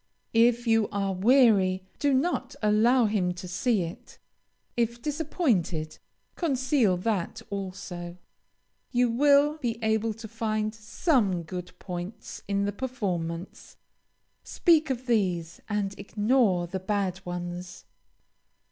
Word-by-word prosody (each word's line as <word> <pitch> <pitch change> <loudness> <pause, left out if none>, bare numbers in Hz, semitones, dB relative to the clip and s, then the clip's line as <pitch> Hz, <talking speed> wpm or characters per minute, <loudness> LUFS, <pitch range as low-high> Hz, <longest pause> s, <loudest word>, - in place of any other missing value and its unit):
If 235 +1 +4
you 225 -2 +3
are 195 -1 -1
weary, 195 -3 +4 0.2
do 285 - +2
not 270 -1 0
allow 225 +4 +4
him 190 -4 0
to 180 +1 -7
see 190 +3 +1
it. 165 0 -9 0.6
If 235 0 0
disappointed, 240 - -1 0.4
conceal 260 - +2
that 190 -2 -2
also. 185 -3 -6 0.7
You 245 -1 +2
will 285 +4 +4
be 240 -5 -2
able 220 0 +1
to 225 0 -9
find 215 -1 -2
some 220 - 0
good 180 +2 -7
points 180 +4 -7
in 200 0 0
the 205 - 0
performance; 185 -8 -4 0.7
speak 320 -4 +3
of 255 -1 -2
these 180 -8 0
and 205 -2 -1
ignore 210 -4 +2
the 190 +2 -4
bad 190 -1 -2
ones. 175 0 -6
210 Hz, 115 wpm, -27 LUFS, 185-245 Hz, 0.7 s, If